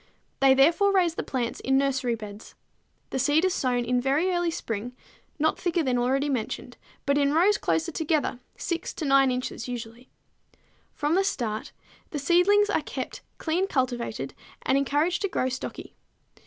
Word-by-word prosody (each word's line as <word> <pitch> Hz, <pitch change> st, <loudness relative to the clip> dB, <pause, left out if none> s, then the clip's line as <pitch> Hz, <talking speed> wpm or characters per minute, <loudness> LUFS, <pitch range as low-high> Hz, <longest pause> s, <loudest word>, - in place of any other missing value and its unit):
They 270 Hz, -1 st, +6 dB
therefore 330 Hz, +9 st, +4 dB
raise 360 Hz, -4 st, +3 dB
the -, -, -3 dB
plants 245 Hz, -3 st, -3 dB
in 265 Hz, 0 st, +2 dB
nursery 265 Hz, -3 st, +1 dB
beds. 210 Hz, -1 st, -10 dB, 0.6 s
The 265 Hz, -, -1 dB
seed 295 Hz, +6 st, +3 dB
is 370 Hz, -, +2 dB
sown 245 Hz, -6 st, 0 dB
in 250 Hz, +1 st, +1 dB
very 285 Hz, +8 st, +2 dB
early 350 Hz, -1 st, +1 dB
spring, 235 Hz, -5 st, -4 dB, 0.4 s
not 315 Hz, +1 st, +1 dB
thicker 345 Hz, -2 st, 0 dB
than 250 Hz, -3 st, +1 dB
already 265 Hz, +4 st, +1 dB
mentioned, 255 Hz, -6 st, -3 dB, 0.3 s
but 280 Hz, 0 st, +2 dB
in 280 Hz, 0 st, +2 dB
rows 395 Hz, +5 st, +4 dB
closer 330 Hz, +1 st, 0 dB
together, 305 Hz, -5 st, 0 dB, 0.2 s
6 340 Hz, 0 st, -3 dB
to 315 Hz, -, -4 dB
9 275 Hz, -1 st, +5 dB
inches 255 Hz, 0 st, -3 dB
usually. 240 Hz, 0 st, -7 dB, 0.9 s
From 295 Hz, +1 st, 0 dB
the 385 Hz, +3 st, +3 dB
start 220 Hz, -, -2 dB, 0.4 s
the 300 Hz, -, -4 dB
seedlings 360 Hz, +8 st, +4 dB
are -, -, +1 dB
kept -, -, -6 dB, 0.2 s
clean 350 Hz, +4 st, 0 dB
cultivated 255 Hz, -6 st, -2 dB, 0.3 s
and 265 Hz, -, +2 dB
encouraged 295 Hz, +6 st, +1 dB
to 400 Hz, -, 0 dB
grow 260 Hz, -, 0 dB
stocky. 260 Hz, 0 st, -6 dB
275 Hz, 165 wpm, -26 LUFS, 250-340 Hz, 0.9 s, They